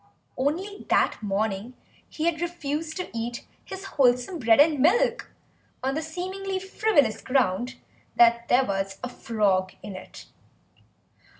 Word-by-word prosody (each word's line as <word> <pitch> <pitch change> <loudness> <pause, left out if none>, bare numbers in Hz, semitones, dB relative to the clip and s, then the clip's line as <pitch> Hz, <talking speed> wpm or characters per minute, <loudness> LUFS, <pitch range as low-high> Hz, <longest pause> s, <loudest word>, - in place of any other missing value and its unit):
Only 355 +10 -2
that - - +2
morning 210 +3 -2 0.3
he 310 - -3
had 335 -1 0
refused 320 -2 -3
to 365 -9 -6
eat 235 +1 -4 0.2
his 385 0 -8
wholesome 265 0 +2
bread 225 0 +4
and 295 -1 +5
milk 330 - +2 0.5
on 265 +1 0
the 310 - -1
seemingly 375 +4 -4
frivolous 375 - +1
ground 250 -2 0 0.4
that 235 0 +5
there 260 +2 +4
was 195 -1 -2
a 250 - -3
frog 200 -6 0
in 205 -2 -7
it. 185 - -11
265 Hz, 130 wpm, -26 LUFS, 225-340 Hz, 0.5 s, and